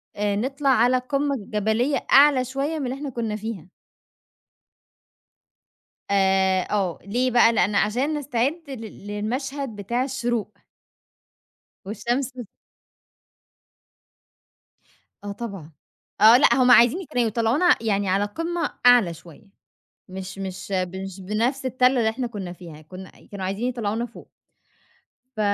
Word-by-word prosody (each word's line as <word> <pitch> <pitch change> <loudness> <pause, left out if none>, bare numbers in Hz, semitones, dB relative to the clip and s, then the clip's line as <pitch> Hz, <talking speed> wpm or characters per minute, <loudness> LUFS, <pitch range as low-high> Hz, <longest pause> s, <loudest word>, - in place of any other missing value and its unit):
آآ، 205 0 -1
نطلَع 275 +5 -1
على 250 0 +4
قمة 275 +2 -1
جبلية 220 +6 -1
أعلى 275 -2 +6
شوية 275 +5 -3
من 275 - -3
اللي 255 +2 -3
إحنا 280 0 -6
كنا 230 -4 -3
فيها. 210 -5 -7 2.4
آآ، 190 -1 +2
آه، 195 -5 -1
ليه 245 +5 0
بقى، 235 -1 +5
لأن 205 -1 +1
عشان 245 +9 +1
نستعِد 280 +3 -1
لل 225 -6 -9
للمشهَد 255 +5 -4
بتاع 235 +5 -2
الشّروق. 240 -5 -2 1.3
والشمس 240 +5 -2 2.9
آه 205 - -5
طبعًا 200 -8 -8 0.5
آه 225 +3 +9
لأ 290 - +5
هُم 255 -1 +4
عايزين 245 +11 +5
كانوا 245 -2 +1
يطلَّعونا 230 - +2
يعني 200 -3 0
على 195 +2 +2
قمة 330 +8 -3 0.2
أعلى 240 -8 +6
شوية 170 +5 -16 0.6
مش 190 +1 -8
مش 190 0 -7
مش 190 +1 -3
بنفس 235 +8 -1
التَل 255 0 +2
اللي 220 -2 +2
إحنا 245 +2 -3
كنا 195 -6 -7
فيها، 165 -4 -12
كنا 185 +4 -11 0.2
كانوا 195 -2 -5
عايزين 200 +6 -2
يطلَّعونا 230 -1 -2
فوق. 235 - -14 1.1
ف - - -6
230 Hz, 120 wpm, -23 LUFS, 200-255 Hz, 2.9 s, آه